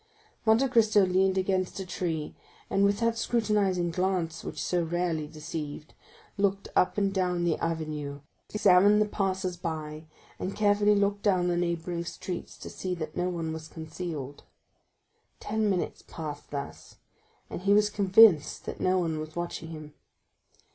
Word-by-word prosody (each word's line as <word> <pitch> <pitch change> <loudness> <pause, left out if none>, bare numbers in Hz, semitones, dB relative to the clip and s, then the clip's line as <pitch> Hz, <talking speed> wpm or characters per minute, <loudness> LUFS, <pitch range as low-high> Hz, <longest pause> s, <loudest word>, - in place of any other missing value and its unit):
Monte 225 +5 +5
Cristo 215 -5 +4
leaned 190 +1 +2
against 185 0 0
a 190 - -4
tree, 170 -4 -3 0.4
and 195 - +3
with 200 +2 +2
that 230 0 +1
scrutinizing 205 -7 +1
glance 180 -2 -1
which - - -5
was - - -4
so 180 -1 0
rarely 165 -2 -1
deceived, 155 -1 -7 0.5
looked 200 0 0
up 180 - +3
and 200 -1 +1
down 180 -2 0
the 170 -2 +2
avenue, 155 -3 -3 0.3
examined 205 0 +5
the 215 - +4
passers 190 -3 -1
by, 155 -2 -5 0.3
and 190 - -3
carefully 205 0 +3
looked 200 0 +1
down 185 -4 +2
the 175 - +1
neighboring 170 0 -2
streets, 175 +1 -6
to - - -9
see 185 -1 -4
that 155 -2 -6
no 180 +1 0
one 165 -3 -3
was 160 -1 -7
concealed. 160 -3 -6 1.0
Ten 215 0 0
minutes 185 -3 -1
passed 150 -3 -7
thus, 140 -1 -7 0.5
and - - -6
he 200 +2 +3
was 210 0 +3
convinced 200 -5 +5
that - - -6
no 185 0 +3
one 165 -3 -1
was 155 0 -7
watching 175 -1 -4
him. 155 -2 -9
180 Hz, 155 wpm, -28 LUFS, 160-200 Hz, 1.0 s, Monte